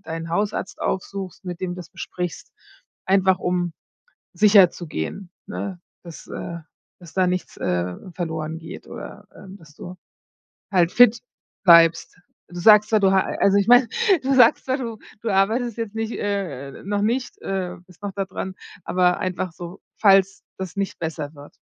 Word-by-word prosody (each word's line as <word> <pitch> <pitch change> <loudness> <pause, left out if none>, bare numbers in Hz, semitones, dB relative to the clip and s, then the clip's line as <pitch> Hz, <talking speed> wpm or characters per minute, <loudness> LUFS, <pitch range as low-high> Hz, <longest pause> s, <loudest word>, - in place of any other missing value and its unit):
deinen 165 -2 -6
Hausarzt 205 +2 -2
aufsuchst, 190 -1 -4
mit 175 -1 -6
dem 185 -1 -2
du 175 - -5
das 180 -2 -9
besprichst, 180 -3 -6 0.5
einfach 190 -1 +3
um 180 -2 -1 0.6
sicherzugehen, 185 - +2 0.2
ne, 195 -3 -5 0.2
dass, 170 -2 -11
äh 170 0 -6 0.4
dass 170 -2 -14
da 185 -1 +2
nichts, 180 0 -3
äh, 90 0 -1 0.2
verloren 160 -2 -4
geht 165 - -10
oder, - - -10
ähm, 195 0 -12
dass 150 -4 -18
du 180 +1 -9 0.8
halt 175 -2 +3
fit 240 -2 +6 0.4
bleibst. 170 -1 +5 0.3
Du 175 0 -8
sagst 210 +2 +6
zwar, 215 -1 +3
du 195 -1 +4
ha 190 -1 +4 0.2
also, 200 0 +4
ich 200 - +1
meine, 245 0 +7 0.3
du 270 +1 +1
sagst 245 +1 +5
ja, 260 - +1
du 230 -5 -6 0.2
du 225 - -2
arbeitest 225 +5 +1
jetzt 225 -2 -5
nicht, 225 +1 -2
äh 190 -10 -4
noch 205 +1 -1
nicht, 245 +4 -1
äh 185 -2 -3
bist 180 +2 -20
noch 200 - -3
da 195 0 -2
dran, 190 0 -6 0.3
aber 180 -1 +2
einfach 185 -1 -3
so, 175 +1 -9 0.2
falls 195 -1 +4
das 190 -3 -6
nicht 195 -1 -3
besser 160 -2 -4
wird. 145 0 -13
190 Hz, 165 wpm, -22 LUFS, 170-205 Hz, 0.8 s, meine